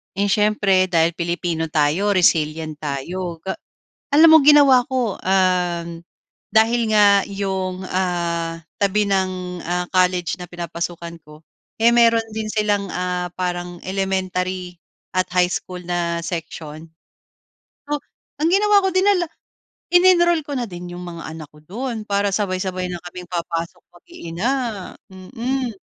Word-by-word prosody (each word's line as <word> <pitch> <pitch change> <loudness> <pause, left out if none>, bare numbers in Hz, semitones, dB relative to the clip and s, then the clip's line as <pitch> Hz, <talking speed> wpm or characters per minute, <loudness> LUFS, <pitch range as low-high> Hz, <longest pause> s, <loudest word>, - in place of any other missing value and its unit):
Eh, 200 +1 0
siyempre 205 -3 +3
dahil 165 -1 +2
Pilipino 170 -1 -2
tayo, 155 +7 +1
resilient 155 -3 +1
tayo. 165 +4 -4
Ga 190 - -4 0.6
alam 320 +3 +8
mo 320 - +9
ginawa 280 -3 +6
ko, 250 -6 -1
um, 180 -2 +1 0.6
dahil 230 +2 +3
nga 200 -1 +5
yung, 190 -2 -3
ah, 170 -2 -1 0.2
tabi 205 +1 +2
ng, 185 -2 -1
ah, 180 +1 0
college 180 -1 +1
na 180 - -7
pinapasukan 170 0 -6
ko, 150 +1 -15 0.4
eh, 230 +1 +6
meron 230 -1 +4
din 215 0 -4
silang, 210 -2 0
ah, 180 0 -2
parang 175 -1 -4
elementary 185 -2 -2 0.4
at 185 - +1
high 180 0 +3
school 180 -1 -5
na 170 -1 -2
section. 160 -2 -6 1.0
So, 295 0 -1 0.4
ang 315 - +3
ginawa 405 0 +4
ko 385 - +3
dinala 375 -3 +3 0.6
in-enroll 350 -2 +5
ko 290 - -9
na 240 - -2
din 175 -1 -8
yong 175 - -7
mga 170 -1 -8
anak 160 -1 -9
ko 150 - -18
do'n, 230 - -5
para 200 0 +1
sabay-sabay 185 -2 -2
na 175 - -5
kaming 180 0 -9
papasok 170 0 -4 0.2
mag-iina, 175 - -5 0.6
mm. 240 +6 -3
185 Hz, 130 wpm, -21 LUFS, 175-215 Hz, 1.0 s, mo